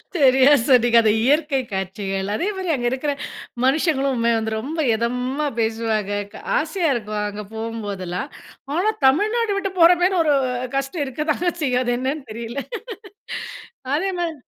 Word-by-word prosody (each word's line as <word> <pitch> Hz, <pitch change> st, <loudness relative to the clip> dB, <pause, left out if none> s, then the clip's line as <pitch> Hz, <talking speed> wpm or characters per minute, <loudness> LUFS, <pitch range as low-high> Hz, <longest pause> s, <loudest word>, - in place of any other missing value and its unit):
சரியா 270 Hz, -1 st, +6 dB
சொன்னீங்க 240 Hz, -3 st, +5 dB
அந்த 220 Hz, -, +3 dB
இயற்கை 290 Hz, 0 st, +2 dB
காட்சிகள். 195 Hz, +1 st, -3 dB
அதே 335 Hz, -, -1 dB
மாரி 375 Hz, -2 st, -4 dB
அங்க 240 Hz, -3 st, 0 dB
இருக்கிற 265 Hz, +3 st, -1 dB, 0.5 s
மனுஷங்களும் 270 Hz, -3 st, +1 dB
வந்து 220 Hz, 0 st, -2 dB
ரொம்ப 295 Hz, +8 st, -5 dB, 0.2 s
எதமா 250 Hz, +5 st, -1 dB
பேசுவாங்க 220 Hz, -2 st, 0 dB, 0.2 s
க -, -, -10 dB, 0.2 s
ஆசையா 330 Hz, +2 st, 0 dB
இருக்கும். 210 Hz, -2 st, -3 dB
அங்க 205 Hz, +1 st, -6 dB
போம்போதெல்லாம். 210 Hz, -1 st, -4 dB, 0.5 s
ஆனா 390 Hz, +6 st, +2 dB
தமிழ்நாடு 420 Hz, -, +3 dB
விட்டு 390 Hz, -1 st, -2 dB
போகிற 340 Hz, +2 st, +8 dB
மாரி 370 Hz, +1 st, +3 dB
ஒரு 300 Hz, -, +3 dB, 0.4 s
கஷ்டம் 275 Hz, +3 st, -1 dB
இருக்க 290 Hz, +4 st, -4 dB
தாங்க 350 Hz, +3 st, 0 dB
செய்யும் 255 Hz, -3 st, +1 dB
அது 245 Hz, -1 st, 0 dB
என்னன்னு 265 Hz, +1 st, -3 dB
தெரில 235 Hz, +3 st, -6 dB, 1.4 s
அதே 385 Hz, +5 st, 0 dB
மாரி 335 Hz, -2 st, -1 dB
265 Hz, 140 wpm, -22 LUFS, 225-310 Hz, 1.4 s, போகிற